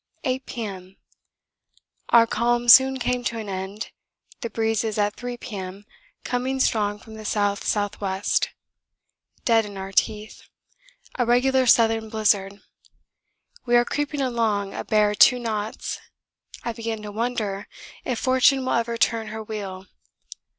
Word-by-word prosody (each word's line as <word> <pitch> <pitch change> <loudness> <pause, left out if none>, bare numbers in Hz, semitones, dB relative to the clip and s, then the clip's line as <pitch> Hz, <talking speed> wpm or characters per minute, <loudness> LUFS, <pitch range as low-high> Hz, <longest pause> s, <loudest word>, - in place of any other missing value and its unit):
8 260 -1 -1
P.M. 195 -5 -7 1.1
Our 230 -1 +7
calm 240 +1 0
soon 265 +2 +8
came 250 -1 -1
to 230 - -1
an 220 -2 -5
end, 195 +2 -5 0.5
the 235 - -4
breeze 225 -1 0
at 205 0 +1
3 245 0 -6
P.M. 200 -4 -7 0.4
coming 260 +2 -2
strong 210 -5 +1
from 220 +1 -14
the 220 - -10
S.S.W., 205 -1 -1 1.2
dead 225 -2 +4
in 205 -2 -8
our 190 0 -6
teeth 210 +2 -1 0.8
a 245 - +3
regular 260 +2 +3
southern 225 -1 +4
blizzard. 205 -2 +1 1.1
We 240 - +3
are 240 0 +5
creeping 290 +1 -2
along 220 -6 0
a - - -4
bare 210 -1 +2
2 250 +4 +6
knots. 220 -3 -4 0.6
I 235 - -3
begin 225 -2 -5
to 210 - -6
wonder 215 -3 -2 0.4
if 250 - -2
fortune 260 +1 +3
will - - 0
ever 235 0 0
turn 230 -1 +1
her 220 +1 -6
wheel. 195 -3 -6
220 Hz, 135 wpm, -24 LUFS, 205-240 Hz, 1.2 s, soon